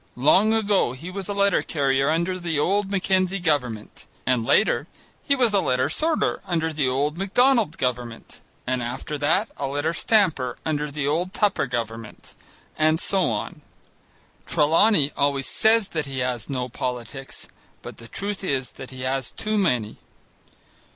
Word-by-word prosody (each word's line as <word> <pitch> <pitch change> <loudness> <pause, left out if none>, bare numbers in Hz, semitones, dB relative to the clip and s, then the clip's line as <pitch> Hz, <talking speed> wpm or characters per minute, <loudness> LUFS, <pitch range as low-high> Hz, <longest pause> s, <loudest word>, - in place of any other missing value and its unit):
Long 190 - +4
ago 205 - +2
he 165 +8 -8
was 195 0 -6
a - - -1
letter 200 0 +3
carrier 135 -2 +1
under 170 +3 0
the 170 -3 -2
old 195 +6 +1
Mackenzie 190 -1 +1
Government, 125 - -2 0.2
and 125 -2 +1
later 215 - +2 0.3
he 280 - +2
was 245 -5 +2
a 200 - +4
letter 130 -7 +1
sorter 320 0 0
under 160 -2 -1
the 145 -3 0
old 145 +5 -1
Macdonald 225 - +2
Government, 120 -2 -4 0.2
and 130 0 -1
after 125 +5 -4
that 190 +9 +1
a 140 - -2
letter 145 +4 -1
stamper 165 - +1
under 150 -1 -1
the 140 -1 -3
old 175 +6 -1
Tupper 205 -10 +1
Government, 115 -2 -6 0.4
and 155 +1 +2
so 190 -1 +2
on. 105 -2 -4 0.9
Trelawney 155 0 +3
always 140 -1 +1
says 220 -2 +2
that 155 -3 -3
he 135 -1 -6
has 125 -4 -2
no 125 -2 -2
politics, 125 +2 -6 0.4
but - - -9
the 115 - -12
truth 200 - -3
is 135 -7 -1
that 135 - -10
he 130 -1 -9
has 130 -1 -2
too 215 0 -3
many. 125 - 0
150 Hz, 155 wpm, -24 LUFS, 130-195 Hz, 0.9 s, Long